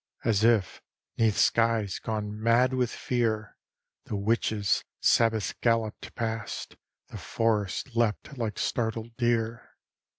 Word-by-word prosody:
As 110 -2 +2
if 115 -6 +2 0.4
'neath 110 -3 +3
skies 115 -4 +2
gone 105 -1 -4
mad 120 +3 +3
with 125 -2 +1
fear 110 -5 -1 0.5
The - - -4
witches' 105 0 +1 0.2
Sabboth 115 -3 +2
galloped 115 -2 0
past, 115 -1 -4 0.3
The - - -8
forests 115 +2 -1
leapt 115 +4 0
like 115 -5 -3
startled 115 0 -2
deer. 115 -1 -1
115 Hz, 110 wpm, -28 LUFS, 110-115 Hz, 0.5 s, neath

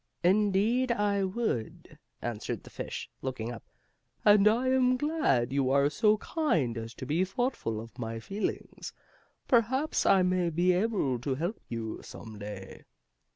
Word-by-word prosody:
"Indeed, 210 +6 +3
I 205 -3 +1
would," 190 - -3 0.2
answered 115 -3 -4
the - - -13
fish, - - -5
looking 120 -3 -4
up. 115 - -8 0.6
"And 205 -1 +7
I 240 +4 +3
am 255 -1 +3
glad 250 - +1
you 135 -2 +2
are 140 +2 +3
so 215 +4 +3
kind 170 - 0
as 115 +1 -6
to - - -7
be 160 +7 +1
thoughtful 195 - -2
of 115 +3 -11
my 115 -1 -4
feelings. 195 - -4 0.5
Perhaps 260 +5 +2
I 190 -1 +6
may 180 -1 +1
be 175 +3 +2
able 180 - 0
to 130 +2 -2
help 175 - -3
you, 115 -2 -4
some 110 -2 -10
day." 100 -2 -8
180 Hz, 150 wpm, -29 LUFS, -, 0.6 s, And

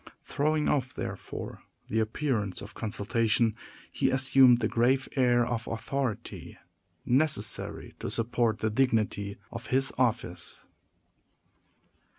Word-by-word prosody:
Throwing 155 +1 0
off, 130 -3 0
therefore, - - -6 0.3
the 110 - 0
appearance 110 -4 -1
of 105 - -9
consultation, 110 +1 0 0.4
he - - +1
assumed 130 -1 +5
the 110 - +1
grave 130 +3 +2
air 120 -3 +3
of 120 -1 -3
authority 115 +1 -4 0.5
necessary 125 -5 +1
to - - -4
support 115 -1 0
the 110 - 0
dignity 105 -5 0
of 115 +1 -7
his 135 +1 0
office. 110 -8 -2
120 Hz, 110 wpm, -29 LUFS, 110-130 Hz, 0.5 s, assumed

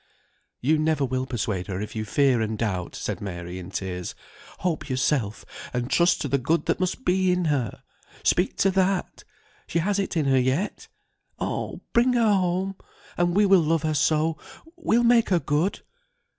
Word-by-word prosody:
"You 150 +5 +2
never 155 -2 +1
will 130 0 -2
persuade 105 -6 -2
her 95 -2 -3
if 105 +2 -6
you 110 0 -2
fear 130 +2 +2
and 110 0 -2
doubt," 95 -6 -2
said - - -4
Mary, 90 -2 -6
in 90 +1 -8
tears. 90 -1 -4 0.5
"Hope 170 -4 -2
yourself, 130 -4 0 0.3
and 125 +1 -2
trust 175 +1 +3
to - - -1
the 140 0 +1
good 160 +7 0
that - - 0
must 185 +8 -2
be 185 0 +3
in 180 -1 +1
her. 135 - -1 0.4
Speak 180 - +2
to 195 - +3
that, 190 0 0 0.4
she - - -2
has 200 +4 +1
it 195 -3 -2
in 155 - +1
her 135 -1 +4
yet, 130 +11 -1 0.5
oh, - - -3
bring 245 +2 +4
her 230 -3 +3
home, 190 0 0 0.4
and 175 0 +1
we 205 +1 +5
will 195 -2 +6
love 160 0 +1
her 155 -1 0
so, 155 +3 +1 0.4
we'll 240 -9 +2
make 235 -1 +4
her 180 -3 +3
good." 155 +5 0
155 Hz, 180 wpm, -25 LUFS, 120-185 Hz, 0.5 s, will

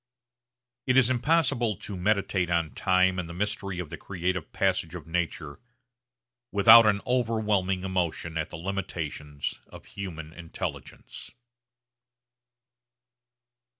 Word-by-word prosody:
It 130 0 +3
is 130 -1 +5
impossible 130 -4 +2
to 100 - -7
meditate 95 -1 0
on 85 -2 0
time 95 -1 +2
and 85 -2 -5
the 85 - -8
mystery 100 -1 -2
of 85 -3 -5
the 85 - -5
creative 90 0 -3
passage 90 -3 0
of 85 - -8
nature 80 -3 -3 0.9
without 110 +3 +8
an 100 -1 +2
overwhelming 110 -6 0
emotion 90 -3 -2
at 80 +1 -2
the - - -7
limitations 80 -5 -4
of - - -13
human 80 -5 -7
intelligence. 85 -1 -7
95 Hz, 115 wpm, -27 LUFS, 85-105 Hz, 0.9 s, without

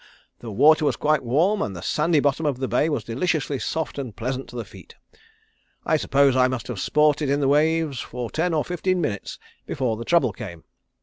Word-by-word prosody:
The 120 - -8
water 155 +9 +5
was 150 - +1
quite 150 -2 +1
warm, 165 - +2
and 100 - -3
the 85 - -8
sandy 155 +1 +2
bottom 145 +2 0
of 145 -4 0
the 130 0 -2
bay 125 +7 +1
was 140 -8 -2
deliciously 140 - -1
soft 160 0 -3
and 125 -6 -6
pleasant 130 +3 -4
to - - -12
the 120 - -4
feet. - - -15 0.9
I 160 - +2
suppose 140 -3 +3
I 130 -1 +4
must 130 -3 -4
have 115 -6 -4
sported 150 +4 +2
in 140 +1 +1
the 140 - +1
waves 155 -1 +2
for 125 -1 -6
ten 175 +3 0
or 155 -2 0
fifteen 180 +1 -1
minutes 105 - -3 0.3
before 125 -5 -1
the 115 - -5
trouble 150 - +2
came. 90 -6 -9
140 Hz, 205 wpm, -23 LUFS, 125-155 Hz, 0.9 s, water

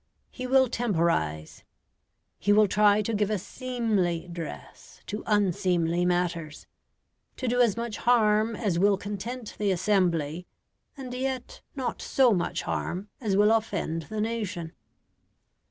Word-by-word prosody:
He 255 0 -5
will 260 0 +5
temporise; 165 - -1 0.8
he 205 - +1
will 210 0 +6
try 210 +1 +4
to 230 - -2
give 210 -1 +1
a 215 - +1
seemly 210 -7 -2
dress 165 - -9
to 210 - -5
unseemly 180 -4 +1
matters: 175 -3 -1 0.7
to 255 - -3
do 245 +1 +2
as 230 -4 +3
much 235 -3 -3
harm 220 -2 +3
as 200 -7 -1
will 200 +1 +4
content 210 +4 -6
the 205 -1 +1
assembly, 175 -4 +1 0.5
and 255 -2 -7
yet 260 0 -4
not 265 -3 -3
so 255 -4 +3
much 180 - -1
harm 190 +4 -3
as 205 -5 0
will 210 +1 +5
offend 165 -8 -1
the 215 -1 -3
nation. 205 -7 -3
205 Hz, 135 wpm, -27 LUFS, 175-230 Hz, 0.8 s, will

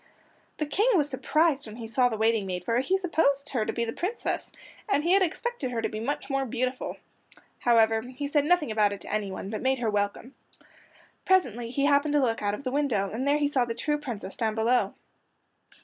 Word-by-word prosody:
The 305 - -1
King 390 - +1
was 300 -5 +3
surprised 290 +1 +1
when 215 - -9
he 230 -1 -7
saw 245 +2 +3
the 220 - -3
waiting 220 -2 +2
maid, 180 -1 -4
for 230 +1 +2
he 365 +9 +1
supposed 320 -7 +1
her 225 -5 -1
to - - 0
be 235 - -1
the 230 - -4
Princess, 410 +7 -3 0.4
and 300 -7 +2
he 340 - +1
had 390 +1 +5
expected 375 - -1
her 240 -2 -2
to - - -1
be 215 - -5
much 265 +6 -3
more 270 -1 0
beautiful. 255 +1 -3 0.6
However, 225 -2 +4
he 255 +4 -6
said 290 0 +2
nothing 325 -6 +2
about 210 -2 +3
it 200 - -8
to - - -6
anyone, 200 -1 -3
but 215 - -4
made 265 +1 +2
her 230 -3 -1
welcome. 205 +5 -2 0.9
Presently 245 - +2
he 275 +3 0
happened 290 +1 +3
to - - +5
look 235 -4 0
out 205 0 0
of 280 - -10
the 255 - -2
window, 250 -9 0
and 255 +5 -2
there 290 +1 +4
he 295 -1 +2
saw 275 -3 +1
the 230 -1 -3
true 295 +4 -1
Princess 225 -9 -6
down 220 -2 -1
below. 235 +3 +1
255 Hz, 220 wpm, -27 LUFS, 225-290 Hz, 0.9 s, had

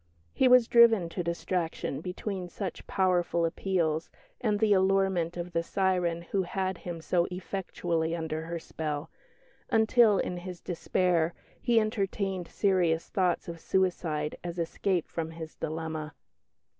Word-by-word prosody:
He 265 - +4
was 250 -2 +7
driven 230 -7 +6
to 175 +1 -3
distraction 170 -4 -2
between 180 +1 -4
such 185 0 -6
powerful 175 -3 +2
appeals 165 -2 0 0.3
and 210 -3 +1
the 215 -1 +4
allurement 190 -3 +2
of 175 0 -4
the 165 - +2
siren 175 -2 0
who 190 +3 -1
had 185 0 -2
him 170 -2 -6
so 175 +1 +1
effectually 175 -3 -2
under 160 -1 -3
her 170 +1 -4
spell, 155 -2 -4 0.6
until 225 -2 +5
in 180 - -1
his 180 0 -7
despair 175 -1 0 0.3
he 235 -2 +4
entertained 195 -4 -1
serious 175 -5 +1
thoughts 185 -1 +1
of 170 -1 -6
suicide 165 -5 0
as 175 0 -5
escape 175 +1 -1
from 160 -1 -4
his 160 -1 -8
dilemma. 155 -1 -4
175 Hz, 135 wpm, -29 LUFS, 165-195 Hz, 0.6 s, was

